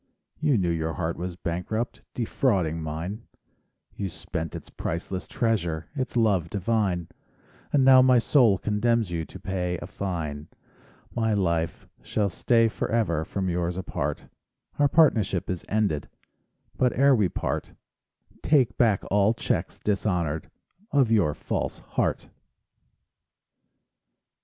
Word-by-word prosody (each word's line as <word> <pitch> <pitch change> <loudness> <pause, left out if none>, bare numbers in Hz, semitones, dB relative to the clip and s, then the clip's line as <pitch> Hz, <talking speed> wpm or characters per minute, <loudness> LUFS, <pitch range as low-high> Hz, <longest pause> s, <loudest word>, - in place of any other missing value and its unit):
You 150 -5 +3
knew 90 -3 +1
your 80 -1 -1
heart 85 -1 -2
was 90 0 -5
bankrupt; 90 +7 -3
Defrauding 95 - 0
mine, 85 +8 -5 0.7
You 100 -2 -3
spent 80 -1 -5
its - - -9
priceless 90 +3 -4
treasure— 100 -11 -1
Its 130 -3 -3
love 100 -8 +2
divine; 100 -4 0 0.6
And 140 -3 +4
now 130 -1 +8
my 130 -1 +5
soul 115 -4 +4
condemns 110 0 +1
you 80 -1 -2
To - - -11
pay 90 -2 -2
a - - -7
fine; 80 -7 -4 0.7
My 110 -2 +1
life 85 -4 -1
shall 105 -2 0
stay 115 +4 +3
forever 110 -8 0
From 95 +3 -3
yours 90 0 -1
apart; 95 - -3 0.5
Our 145 - +5
partnership 110 - +3
is 90 - -4
ended, 100 -9 0 0.7
But 125 -1 +2
ere 140 +1 +6
we 105 -7 +3
part— - - -3 0.7
Take 130 -7 +2
back 110 -5 +3
all 105 +3 +4
checks - - -2
dishonored 90 -7 -1 0.4
Of 135 -5 +3
your 85 -10 +3
false - - -3
heart. - - -2
100 Hz, 125 wpm, -26 LUFS, 85-115 Hz, 0.7 s, now